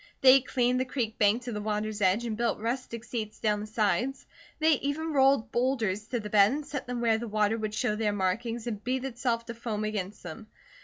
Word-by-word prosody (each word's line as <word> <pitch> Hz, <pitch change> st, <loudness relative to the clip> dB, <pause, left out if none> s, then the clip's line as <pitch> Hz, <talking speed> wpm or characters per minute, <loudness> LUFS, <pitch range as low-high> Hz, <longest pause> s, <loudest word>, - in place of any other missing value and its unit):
They 265 Hz, 0 st, +8 dB
cleaned 250 Hz, 0 st, +1 dB
the 260 Hz, -, 0 dB
creek 240 Hz, -4 st, -3 dB
bank 215 Hz, +4 st, +3 dB
to 245 Hz, -, -5 dB
the 210 Hz, -2 st, -4 dB
water's 210 Hz, 0 st, -2 dB
edge 195 Hz, +5 st, +3 dB
and 225 Hz, -2 st, -2 dB
built 235 Hz, +1 st, 0 dB
rustic 235 Hz, 0 st, -4 dB
seats 220 Hz, -3 st, -5 dB
down 210 Hz, -1 st, +1 dB
the 210 Hz, -, -6 dB
sides. 215 Hz, +5 st, 0 dB, 0.3 s
They 315 Hz, -3 st, +3 dB
even 310 Hz, +3 st, -2 dB
rolled 270 Hz, -3 st, +3 dB
boulders 225 Hz, -5 st, 0 dB
to 240 Hz, 0 st, -2 dB
the 210 Hz, -, -6 dB
bed 205 Hz, 0 st, +5 dB
and 295 Hz, +2 st, -3 dB
set 275 Hz, -3 st, -5 dB
them 245 Hz, -1 st, -3 dB
where 225 Hz, -2 st, +2 dB
the 235 Hz, -, -5 dB
water 215 Hz, +1 st, +1 dB
would 215 Hz, -1 st, -3 dB
show 210 Hz, -, 0 dB
their 210 Hz, -1 st, 0 dB
markings 220 Hz, +4 st, -1 dB
and 215 Hz, -4 st, -4 dB
beat 260 Hz, +1 st, -1 dB
itself 240 Hz, -2 st, -2 dB
to 235 Hz, -, -6 dB
foam 225 Hz, -2 st, -4 dB
against 210 Hz, -2 st, -4 dB
them. 175 Hz, +6 st, -8 dB
230 Hz, 220 wpm, -28 LUFS, 210-250 Hz, 0.3 s, They